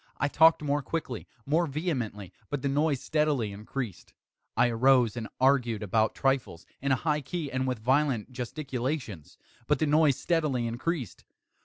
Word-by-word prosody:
I 145 Hz, -, +1 dB
talked 160 Hz, +1 st, +5 dB
more 145 Hz, 0 st, 0 dB
quickly 130 Hz, -5 st, -4 dB, 0.2 s
more 165 Hz, +4 st, +2 dB
vehemently; 130 Hz, -, -3 dB, 0.2 s
but 145 Hz, -2 st, -3 dB
the -, -, +1 dB
noise 145 Hz, -1 st, +1 dB
steadily 150 Hz, -8 st, 0 dB
increased. 105 Hz, 0 st, -6 dB, 0.4 s
I 120 Hz, -, +4 dB
arose 120 Hz, -1 st, +4 dB
and 115 Hz, -2 st, -4 dB
argued 125 Hz, -5 st, +2 dB
about 110 Hz, +2 st, +1 dB
trifles, 135 Hz, -11 st, -1 dB, 0.2 s
in 140 Hz, 0 st, 0 dB
a -, -, +5 dB
high 150 Hz, +3 st, 0 dB
key 155 Hz, 0 st, -4 dB
and 130 Hz, 0 st, -1 dB
with 125 Hz, -1 st, -1 dB
violent 130 Hz, 0 st, +1 dB
gesticulations; 125 Hz, -, -4 dB, 0.3 s
but 150 Hz, -, +3 dB
the 155 Hz, -, +1 dB
noise 150 Hz, -2 st, +4 dB
steadily 150 Hz, -8 st, 0 dB
increased. 125 Hz, -, -3 dB
135 Hz, 155 wpm, -28 LUFS, 120-150 Hz, 0.4 s, talked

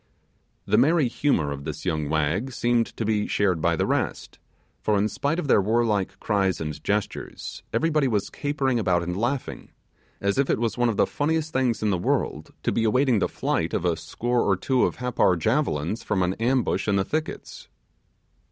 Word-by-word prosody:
The 105 Hz, +3 st, +3 dB
merry 150 Hz, +2 st, +4 dB
humour 115 Hz, -, 0 dB
of 70 Hz, 0 st, -6 dB
this -, -, -6 dB
young 75 Hz, -2 st, -1 dB
wag 80 Hz, -, 0 dB
seemed 120 Hz, -1 st, +1 dB
to 115 Hz, -, -2 dB
be 105 Hz, -1 st, 0 dB
shared 95 Hz, -5 st, +1 dB
by 85 Hz, +1 st, +2 dB
the -, -, 0 dB
rest, -, -, -2 dB, 0.4 s
for 105 Hz, -1 st, +1 dB
in 100 Hz, +2 st, +2 dB
spite 145 Hz, +8 st, -1 dB
of 180 Hz, -, -2 dB
their 105 Hz, -, +5 dB
warlike 105 Hz, -2 st, 0 dB
cries 95 Hz, -4 st, 0 dB
and 75 Hz, -2 st, -5 dB
gestures, 105 Hz, 0 st, -3 dB
everybody 155 Hz, -3 st, +2 dB
was 105 Hz, -5 st, -1 dB
capering 140 Hz, -4 st, -1 dB
and 90 Hz, -3 st, 0 dB
laughing, 120 Hz, +6 st, -3 dB, 0.5 s
as 100 Hz, +5 st, 0 dB
if 140 Hz, -, +2 dB
it -, -, +2 dB
was 115 Hz, -2 st, -1 dB
one 120 Hz, -1 st, +2 dB
of 110 Hz, -, -2 dB
the -, -, +4 dB
funniest 160 Hz, +1 st, -1 dB
things 125 Hz, -4 st, +1 dB
in 105 Hz, -, +2 dB
the 90 Hz, -, 0 dB
world -, -, -1 dB
to -, -, +1 dB
be 115 Hz, -, 0 dB
awaiting 125 Hz, +1 st, +3 dB
the -, -, 0 dB
flight -, -, -1 dB
of -, -, -1 dB
a 85 Hz, -2 st, +2 dB
score 120 Hz, +8 st, -1 dB
or 95 Hz, -2 st, +2 dB
two 130 Hz, +6 st, +2 dB
of -, -, -2 dB
Happar 125 Hz, -7 st, +2 dB
javelins 105 Hz, -, 0 dB
from 95 Hz, -3 st, 0 dB
an 90 Hz, +1 st, 0 dB
ambush 125 Hz, 0 st, +1 dB
in 100 Hz, -, +2 dB
the 95 Hz, -1 st, +1 dB
thickets. 155 Hz, 0 st, -5 dB
110 Hz, 190 wpm, -25 LUFS, 95-130 Hz, 0.5 s, their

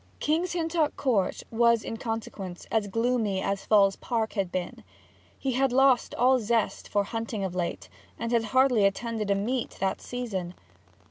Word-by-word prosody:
King's 335 Hz, +4 st, 0 dB
Hintock 330 Hz, -3 st, 0 dB
Court 215 Hz, -9 st, 0 dB
was 235 Hz, 0 st, +3 dB
in -, -, -4 dB
consequence 215 Hz, -6 st, -5 dB
as 220 Hz, -2 st, +1 dB
gloomy 225 Hz, -2 st, 0 dB
as 195 Hz, +1 st, -2 dB
Falls 200 Hz, -2 st, +4 dB
Park 225 Hz, -2 st, -2 dB
had 195 Hz, -4 st, -1 dB
been. 180 Hz, -1 st, -4 dB, 0.5 s
He 270 Hz, -, -2 dB
had 265 Hz, +1 st, +2 dB
lost 265 Hz, -1 st, +3 dB
all 255 Hz, +2 st, +4 dB
zest 225 Hz, -1 st, -1 dB
for 205 Hz, -, +2 dB
hunting 225 Hz, -1 st, -4 dB
of 190 Hz, -2 st, -3 dB
late, 175 Hz, -2 st, -3 dB, 0.3 s
and 230 Hz, 0 st, -3 dB
had 230 Hz, -2 st, +2 dB
hardly 255 Hz, -2 st, +3 dB
attended 215 Hz, +1 st, -1 dB
a 200 Hz, -, +3 dB
meet 235 Hz, +5 st, -2 dB
that 190 Hz, 0 st, -1 dB
season. 195 Hz, -8 st, -4 dB
225 Hz, 160 wpm, -27 LUFS, 200-250 Hz, 0.5 s, Falls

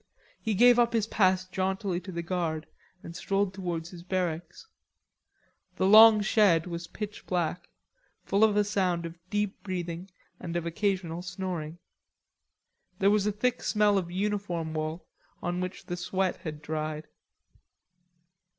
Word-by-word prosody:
He 220 Hz, -2 st, -1 dB
gave 245 Hz, +3 st, +6 dB
up 235 Hz, -1 st, +3 dB
his 225 Hz, -3 st, +2 dB
pass 185 Hz, -4 st, +2 dB
jauntily 190 Hz, 0 st, -2 dB
to 185 Hz, +1 st, -9 dB
the 170 Hz, -1 st, -4 dB
guard 165 Hz, -3 st, -2 dB, 0.4 s
and 170 Hz, -, -9 dB
strolled 195 Hz, +1 st, 0 dB
towards 175 Hz, -3 st, -4 dB
his 175 Hz, -2 st, -10 dB
barracks. 180 Hz, -, -3 dB, 1.1 s
The -, -, 0 dB
long 215 Hz, +2 st, +9 dB
shed 205 Hz, -6 st, +4 dB
was 170 Hz, -1 st, -5 dB
pitch 210 Hz, +2 st, -7 dB
black, 175 Hz, 0 st, -2 dB, 0.6 s
full 200 Hz, +2 st, +2 dB
of 210 Hz, -2 st, +4 dB
a 210 Hz, -, +5 dB
sound 185 Hz, -4 st, 0 dB
of 165 Hz, 0 st, -8 dB
deep 205 Hz, -1 st, -2 dB
breathing 180 Hz, -1 st, -5 dB, 0.3 s
and 170 Hz, -1 st, -6 dB
of 170 Hz, -1 st, -1 dB
occasional 175 Hz, -1 st, -1 dB
snoring. 175 Hz, -3 st, -5 dB, 1.2 s
There 195 Hz, +2 st, +4 dB
was 210 Hz, -1 st, +2 dB
a -, -, +2 dB
thick 235 Hz, +5 st, -1 dB
smell 210 Hz, -2 st, +3 dB
of 175 Hz, -2 st, -5 dB
uniform 185 Hz, -4 st, -2 dB
wool 155 Hz, +2 st, -3 dB, 0.3 s
on 175 Hz, +1 st, -2 dB
which 185 Hz, +1 st, -5 dB
the 175 Hz, -, -3 dB
sweat 185 Hz, +1 st, -1 dB
had 150 Hz, -2 st, -7 dB
dried. 155 Hz, 0 st, -4 dB
185 Hz, 145 wpm, -28 LUFS, 170-205 Hz, 1.2 s, long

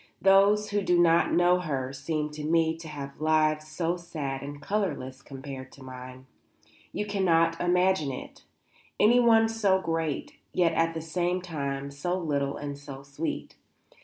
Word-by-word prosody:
Those 200 Hz, +2 st, +5 dB
who 205 Hz, 0 st, +1 dB
do 180 Hz, -2 st, +2 dB
not 170 Hz, -1 st, +4 dB
know 175 Hz, +1 st, +4 dB
her 135 Hz, -6 st, -3 dB
seem 150 Hz, +2 st, -3 dB
to 150 Hz, 0 st, -7 dB
me 160 Hz, +1 st, +2 dB
to 165 Hz, 0 st, -10 dB
have 140 Hz, -1 st, -8 dB
lives 155 Hz, 0 st, +2 dB
so 165 Hz, +3 st, -2 dB
sad 145 Hz, -6 st, -5 dB
and 145 Hz, +1 st, -7 dB
colourless 150 Hz, -8 st, -3 dB
compared 135 Hz, -1 st, -9 dB
to 140 Hz, -, -13 dB
mine. 130 Hz, 0 st, -10 dB, 0.7 s
You 210 Hz, -, -3 dB
cannot 165 Hz, -5 st, +2 dB
imagine 180 Hz, -4 st, +2 dB
it, 130 Hz, -, -9 dB, 0.6 s
anyone 230 Hz, 0 st, +5 dB
so 210 Hz, -4 st, +2 dB
great, 165 Hz, -4 st, -3 dB
yet 170 Hz, -2 st, +3 dB
at 165 Hz, 0 st, +1 dB
the 160 Hz, -, -3 dB
same 175 Hz, +3 st, -1 dB
time 140 Hz, -5 st, -4 dB
so 175 Hz, +6 st, -2 dB
little 145 Hz, -5 st, -1 dB
and 145 Hz, -1 st, -6 dB
so 140 Hz, -1 st, -9 dB
sweet. 140 Hz, +4 st, -5 dB
160 Hz, 155 wpm, -28 LUFS, 140-180 Hz, 0.7 s, Those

